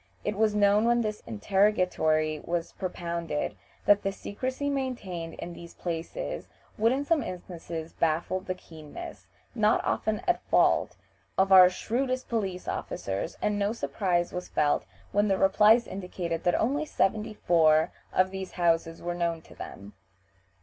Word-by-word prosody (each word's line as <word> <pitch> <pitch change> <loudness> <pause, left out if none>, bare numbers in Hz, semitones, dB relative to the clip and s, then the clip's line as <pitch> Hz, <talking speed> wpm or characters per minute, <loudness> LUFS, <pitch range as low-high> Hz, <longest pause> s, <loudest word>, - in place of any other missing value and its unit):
It 210 - -1
was 215 0 +2
known 205 +1 +4
when 240 0 +3
this 215 -2 -3
interrogatory 155 - +2
was 170 -1 -2
propounded 170 -4 -3 0.3
that 205 0 +5
the 195 - -1
secrecy 255 +8 -4
maintained 235 -12 -3
in 175 - -7
these 170 0 -11
places 175 - -4 0.3
would 225 +2 +3
in 275 +2 0
some 325 -1 +2
instances 170 -4 -6
baffle 165 +3 0
the 185 0 -4
keenness, 155 -4 -10 0.3
not - - +3
often - - 0
at - - +1
fault, 90 - +3 0.4
of 195 0 +3
our 185 -1 +10
shrewdest 255 +7 -2
police 195 -6 -2
officers, 100 - -3
and 210 -1 +1
no 205 +2 +1
surprise 180 -6 -1
was 180 0 -5
felt 145 -8 +1 0.2
when 205 +1 +2
their 195 -1 +2
replies 215 +5 +5
indicated 180 -3 -4
that 175 - +3
only 280 +7 +1
seventy 215 -6 0
four 160 -3 +4 0.2
(74) - - -4
of 185 0 0
these 190 -1 -5
houses 165 -2 +1
were 175 0 -2
known 170 -2 -1
to - - -15
them. 100 +1 -9
185 Hz, 150 wpm, -28 LUFS, 170-210 Hz, 0.4 s, our